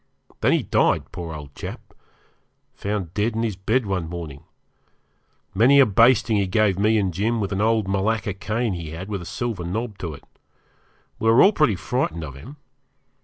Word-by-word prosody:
Then - - +3
he - - +1
died, - - +1
poor 85 -2 -6
old 75 -2 -10
chap - - -9 0.8
found 100 -5 -4
dead 105 +2 0
in 115 - -1
his 110 -4 -1
bed 110 +6 0
one 90 -5 -2
morning. 80 -4 -7 1.1
Many 125 +8 +5
a 135 - +8
basting 115 +1 +4
he 100 -1 +1
gave 100 -1 +2
me 110 +2 +3
and 95 -4 0
Jim 110 +6 0
with 100 -2 -2
an 100 +1 -1
old 110 -2 +2
malacca 100 +2 0
cane 105 +3 -2
he 85 -3 -6
had 95 +5 -7
with 100 -3 -3
a - - -8
silver 100 -1 -3
knob 105 +4 -4
to 80 -4 -5
it. - - -16 1.0
We 110 - +2
were 115 +3 +7
all 200 - +6
pretty 150 - +2
frightened 90 -6 -2
of 70 -4 -7
him. 115 - -11
100 Hz, 185 wpm, -23 LUFS, 90-115 Hz, 1.1 s, a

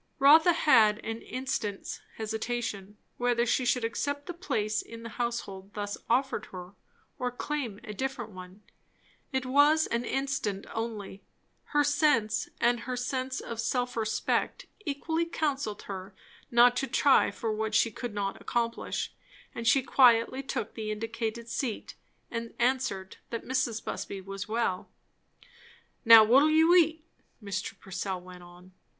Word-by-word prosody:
Rotha 310 +5 +7
had 220 -10 +5
an 225 +1 -4
instant's 250 -6 -4 0.2
hesitation, 220 -2 -4 0.2
whether 245 -1 +1
she 250 +1 +1
should 245 0 +1
accept 285 +5 -2
the 355 - -5
place 220 - -1
in 230 0 -11
the 230 - -6
household 210 -4 -4
thus 205 -1 -3
offered 250 -3 +1
her, 180 -1 -9 0.5
or 250 - 0
claim 245 -4 -4
a 210 - -7
different 265 -1 -4
one. 185 +2 -12 0.7
It 265 -1 -1
was 290 +4 +4
an 235 +1 -1
instant 270 -7 -2
only; 220 -4 -5 0.4
her 295 0 +2
sense 285 -7 +2
and 240 0 +3
her 250 +2 -4
sense 255 +1 -2
of 230 -1 -5
self 245 +1 -1
respect 220 -1 -1 0.2
equally 320 +3 -1
counselled 285 -9 -2
her 190 0 -7 0.3
not 240 +1 +6
to 270 - 0
try 280 0 +4
for 225 -2 -3
what 215 0 -2
she 230 - +3
could 235 0 -6
not 195 -1 -3
accomplish; 235 -1 -2 0.4
and 230 -1 -4
she 270 +2 +5
quietly 250 0 +4
took 275 - -4
the 220 -2 -5
indicated 225 +1 -4
seat, 235 -1 -3 0.4
and 230 -1 -5
answered 240 -7 -1
that 230 - -5
Mrs. 255 -4 -1
Busby 195 - -4
was 195 +1 -6
well. 215 -4 -1 1.1
"Now, 225 -1 +10
what'll 265 +8 +5
you 320 +2 +5
eat?" 320 -2 +4 0.3
Mr. 200 -3 -5
Purcell 190 0 -4
went 180 0 -12
on. 175 +1 -15
230 Hz, 145 wpm, -29 LUFS, 210-265 Hz, 1.1 s, Now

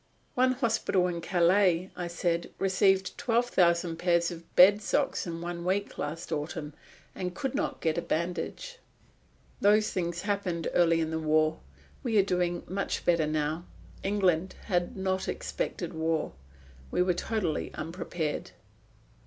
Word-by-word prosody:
"One 255 0 +3
hospital 225 -7 +1
in 170 -1 -3
Calais," 180 +1 +3
I 175 -1 -3
said, 170 0 -1
"received 190 0 +2
twelve 240 +1 +1
thousand 170 -3 +2
pairs 170 0 +2
of 170 -1 -11
bed 200 +3 +8
socks 270 -1 0
in 165 0 -5
one 170 0 -4
week 195 +3 -1
last 155 +4 -4
autumn, 150 0 -3 0.4
and 180 -2 -4
could 270 +3 -2
not - - -2
get 160 0 +1
a - - -2
bandage." 180 - -3 0.8
"Those 210 +1 +4
things 175 -1 -2
happened 200 -5 -1
early 165 -1 +4
in 160 0 -1
the 160 - -1
war. 155 0 +2 0.4
We 235 -5 0
are 200 - +6
doing 180 -2 0
much 195 +2 -2
better 170 -3 +3
now. 155 +2 -1 0.4
England 190 -3 +1
had 175 -1 -1
not 190 0 -1
expected - - -3
war. 160 0 -1 0.6
We 180 - +2
were 180 0 +2
totally 180 -3 -2
unprepared." 165 -1 -4
175 Hz, 145 wpm, -29 LUFS, 165-195 Hz, 0.8 s, bed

